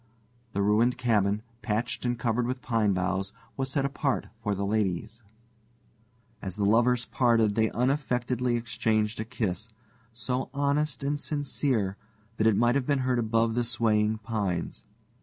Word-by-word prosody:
The 100 - +1
ruined 115 +5 +3
cabin, 105 -4 +1 0.2
patched 115 +2 -2
and 120 0 0
covered 120 0 0
with 125 0 -3
pine 115 -4 +2
boughs, 95 +2 -1 0.2
was 135 -1 -1
set 140 0 +1
apart 140 -1 -1
for 105 -2 0
the 100 +1 -2
ladies. 105 +2 -1 1.2
As 95 -2 -4
the 105 - 0
lovers 120 +3 +3
parted, 115 -4 +3
they 110 +1 +2
unaffectedly 125 -1 0
exchanged 110 -2 0
a 110 - -2
kiss, 110 -2 -3 0.4
so 125 +3 -3
honest 145 0 0
and 145 +1 0
sincere 135 -9 -1 0.4
that 110 - +3
it 110 -3 +4
might 120 +1 +4
have 135 -2 0
been 140 -2 +2
heard 125 -1 +2
above 115 0 +2
the 120 +1 +1
swaying 110 -2 +1
pines. 100 -5 -3
115 Hz, 150 wpm, -28 LUFS, 105-125 Hz, 1.2 s, it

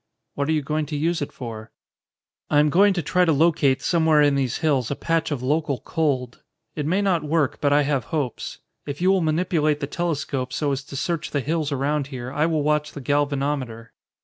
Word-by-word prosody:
"What 140 +1 -2
are - - +3
you 155 -2 +1
going 150 +1 -1
to 150 - -4
use 165 +3 0
it 145 - -3
for?" 115 -3 -8 0.8
"I 150 - +2
am 150 0 +4
going 200 +5 +5
to 175 - -1
try 180 +5 +2
to 170 - +3
locate 145 -3 +3
somewhere 160 -3 +3
in 145 -1 +4
these 135 -3 0
hills 140 -7 +1
a 140 - -1
patch 165 +1 0
of 140 -5 -3
local 145 0 0
cold. 135 -7 -1 0.3
It 150 -1 -2
may 190 +5 +1
not 185 -4 +2
work, 150 -2 0
but 145 - +2
I 145 +1 +4
have 140 -5 0
hopes. 140 -7 -3 0.3
If 145 0 -5
you 185 +2 +3
will 190 -1 +3
manipulate 155 -2 +1
the 145 - -2
telescope 145 -5 -2
so 145 -1 0
as 135 0 -2
to 140 - -9
search 165 +3 -2
the 145 - -1
hills 155 +2 -1
around 140 +1 0
here, 130 -2 -6
I 150 +3 +1
will 155 -3 0
watch 150 0 0
the 145 - -7
galvanometer." 140 -4 -1
150 Hz, 215 wpm, -23 LUFS, 140-160 Hz, 0.8 s, going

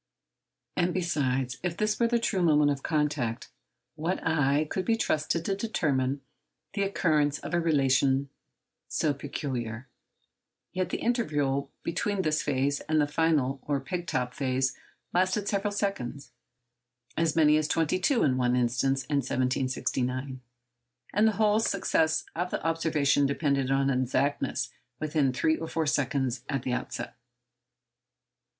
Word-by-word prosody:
And, 175 -1 +1
besides, 135 -8 0
if 175 -2 -3
this 215 0 0
were 235 - +4
the 235 0 +2
true 220 -5 0
moment 150 -3 +4
of 140 -1 -3
contact, 145 -7 -1 0.4
what 165 +4 -2
eye 150 -2 +2
could 185 - -2
be 230 - +2
trusted 160 -3 0
to 195 - 0
determine 140 - 0 0.5
the 200 - -1
occurrence 155 -7 +2
of - - -7
a 175 - +3
relation 135 -3 +2 0.6
so 150 - 0
peculiar? 130 -4 -4 0.9
Yet 185 -1 -1
the - - -2
interval 145 - 0
between 195 +3 -1
this 155 0 +1
phase 140 0 0
and 155 0 +3
the 145 - +4
final 145 -3 +1
or 145 -2 -1
peg 175 +5 -4
top 125 0 -1
phase 130 0 0 0.4
lasted 185 +3 +1
several 200 +1 0
seconds—as 125 - -5
many 150 -2 +5
as 155 -1 +1
twenty 165 +3 +1
two 235 +6 +2
in 130 -3 +2
one 125 -1 +2
instance 125 +2 +1
in 145 -2 +1
1769—and 125 - -2
the 220 - +2
whole 210 +1 +3
success 160 -7 +1
of 175 +2 -1
the - - -4
observation 155 -4 +2
depended 140 -2 0
on 135 0 +2
exactness 130 +2 0 0.3
within 150 -3 +1
three 155 +5 +1
or 165 - -5
four 160 0 -1
seconds 135 -3 0
at 135 -3 -1
the 125 - -1
outside. 125 0 -4
145 Hz, 140 wpm, -28 LUFS, 130-170 Hz, 0.9 s, many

